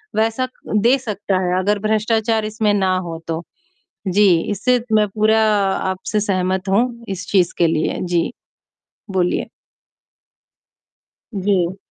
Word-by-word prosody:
वैसा 225 +4 +1 0.3
दे 235 +6 +4
सकता 205 -5 -2
है, 180 +1 +1
अगर 205 +2 +1
भ्रष्टाचार 220 +1 +1
इसमें 215 -1 0
ना 190 -2 +2
हो 170 -3 -5
तो। 165 +1 -3 0.6
जी, 200 +2 +4 0.2
इससे 250 +5 +2
मैं 210 -1 +4
पूरा 215 +2 +2 0.5
आपसे 200 +3 -2
सहमत 190 -1 -1
हूँ 235 +6 +3 0.2
इस 195 0 -5
चीज़ 185 -4 +3
के 170 - +4
लिए। 160 -1 -1
जी, 175 0 0 0.8
बोलिए? 180 -2 0 1.9
जी। 190 -2 0
205 Hz, 120 wpm, -19 LUFS, 185-215 Hz, 1.9 s, दे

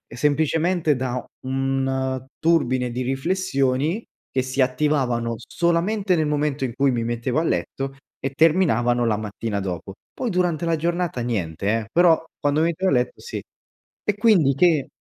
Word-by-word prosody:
semplicemente 155 +3 +2
da 125 0 -2 0.2
un 135 0 -1
turbine 130 -7 +2
di 125 +2 -3
riflessioni 140 - 0 0.3
che 130 - +1
si 130 +1 -1
attivavano 125 -3 +1
solamente 180 - 0
nel 155 -2 +1
momento 150 -2 0
in 120 -3 -2
cui 135 +1 +2
mi 115 -2 -1
mettevo 120 +4 -1
a - - 0
letto 135 - -2 0.2
e 135 - -2
terminavano 130 -7 +3
la 110 -2 +1
mattina 105 0 -3
dopo, 95 0 -5 0.2
poi 250 - -3
durante 175 -4 0
la 165 -1 +2
giornata 170 -3 -1
niente 100 -6 -2
eh, 110 - -6
però 170 -2 +5 0.2
quando 145 +2 +1
mi 165 - +3
mettevo 185 +3 -1
a - - +3
letto 125 -1 0
sì, 475 - -5 0.6
e 210 - +1
quindi 200 - +4
che 160 -3 +3
135 Hz, 155 wpm, -23 LUFS, 125-165 Hz, 0.6 s, però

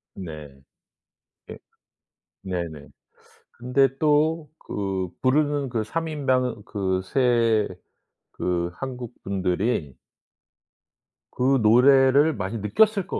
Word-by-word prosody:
네. 75 -5 -8 1.0
예. - - -9 0.8
네네. 85 -6 -5 0.7
근데 125 +3 +2
또 155 +1 +2 0.2
그 95 -2 -2
부르는 145 +1 +1
그 115 -3 -1
3 165 +9 -3
인방 130 -6 -1
그 95 -4 -2
3 115 -1 +2 0.7
그 85 -1 -2
한국분들이 100 - -3 1.4
그 135 +2 +2
노래를 135 +6 +5
많이 100 +2 -4
느꼈을 195 - +2
것 - - -3
120 Hz, 140 characters per minute, -24 LUFS, 95-140 Hz, 1.4 s, 노래를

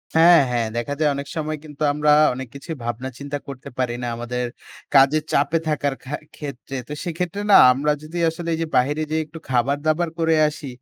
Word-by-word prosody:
হ্যাঁ, 170 +1 +7
হ্যাঁ, 115 -2 0
দেখা 120 +4 -2
যায় 150 -1 +3
অনেক 140 0 -5
সময় 155 -1 -2
কিন্তু 150 -1 -13
আমরা 150 0 +2 0.2
অনেক 130 +1 -6
কিছুই 160 +4 -6
ভাবনা 120 +3 -3
চিন্তা 145 0 -4
করতে 140 0 -8
পারি 125 -2 -1
না। - - -2
আমাদের 125 +1 -3 0.5
কাজের 140 +3 +5
চাপে 145 +4 +2
থাকার 145 -2 0
খা 140 - -4 0.2
ক্ষেত্রে। 140 -2 -7
তো 150 - -6
সেক্ষেত্রে 180 +3 -3
না - - +9 0.2
আমরা 145 +3 0
যদি 165 +3 -7
আসলে 170 +1 -6
এই - - -1
যে 165 - -1
বাহিরে 145 +5 +1
যে 155 - 0
একটু 160 +2 -11
খাবার-দাবার 145 +7 +1
করে 165 -1 +3
আসি, 150 -1 -6
145 Hz, 195 wpm, -22 LUFS, 130-160 Hz, 0.5 s, না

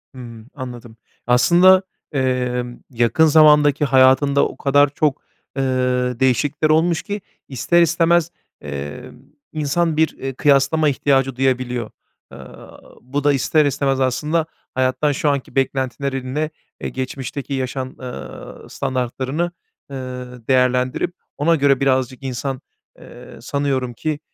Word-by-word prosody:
Hımm. 115 -2 -11
Anladım. 120 -4 -9 0.3
Aslında, 175 +10 +5 0.3
emm, 125 -2 -1
yakın 120 +5 +2
zamandaki 150 -1 +5
hayatında 135 +1 +4
o - - -11
kadar 145 +1 +3
çok, 145 0 -1 0.4
eee, 135 - +1 0.6
değişiklikler 145 +4 +1
olmuş 160 +2 +2
ki 205 0 -5 0.3
ister 170 +6 +2
istemez, 170 0 +2 0.3
eee, 70 0 -7 0.4
insan 155 +1 0
bir, 160 0 +3
eee, 135 0 -5
kıyaslama 145 +3 +3
ihtiyacı 135 -2 +1
duyabiliyor. 125 -3 -1 0.4
Aaa, - - -13 0.2
bu 140 +3 -4
da 145 - +4
ister 150 +3 +2
istemez 135 -1 0
aslında 150 +5 0 0.3
hayattan 130 +3 +1
şu 145 +1 0
anki 140 -2 -3
beklentilerinle, 135 +2 -2 0.3
eee, - - -3
geçmişteki 130 +1 -5
yaşam, 130 0 -3
eee, 125 -1 -6 0.6
standartlarını, 130 +6 -2 0.4
eee, - - -6 0.5
değerlendirip 125 +3 +1 0.2
ona 165 +3 +3
göre 140 -3 +3
birazcık 130 -1 0
insan, 130 +1 -4 0.4
eee, - - -13
sanıyorum 135 -3 -2
ki, 155 +5 -3
135 Hz, 115 wpm, -20 LUFS, 130-150 Hz, 0.6 s, Aslında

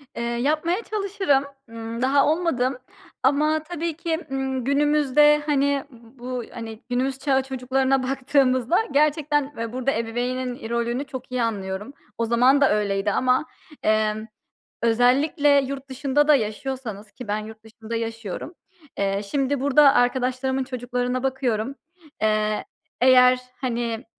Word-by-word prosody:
Eee, 235 - -3
yapmaya 305 - 0
çalışırım, 395 -9 0 0.3
ımm, 230 +1 -6
daha 275 +2 +3
olmadım. 290 -6 0 0.5
Ama 300 +4 +3
tabii 335 0 -3
ki, 330 -1 -2
ımm, 265 -1 -2
günümüzde, 295 +1 +4
hani, 280 -2 +1
ııı, 235 - -16 0.2
bu, 250 0 -4
hani, 225 -2 -7
günümüz 260 +2 -1
çağı 270 -1 +1
çocuklarına 265 0 0
baktığımızda 260 +1 +2
gerçekten 295 0 +1
ve 230 0 -4
burada 255 +1 0
ebeveynin 245 +2 -2
i 225 - -8
rolünü 235 +2 -1
çok 260 -2 -9
iyi 250 -1 0
anlıyorum. 205 +1 -3 0.2
O 230 - 0
zaman 250 +5 +4
da 280 - +5
öyleydi 205 -1 0
ama, 255 +6 +2 0.4
emm, 215 0 +1 0.6
özellikle 275 +5 +3
yurt 275 0 -6
dışında 280 +2 +1
da 300 - +7
yaşıyorsanız 220 -2 -4
ki 250 - -10
ben 205 +1 0
yurt 220 0 -10
dışında 225 +1 -8
yaşıyorum. 225 - -5 0.4
Eee, 195 0 0
şimdi 280 -1 0
burada 280 +1 +5
arkadaşlarımın 260 +1 +1
çocuklarına 250 0 -3
bakıyorum. 260 -2 -1 0.5
Eee, 215 0 +1 0.4
eğer, 250 0 +6 0.2
hani, 235 -2 -2
255 Hz, 130 wpm, -23 LUFS, 230-280 Hz, 0.6 s, da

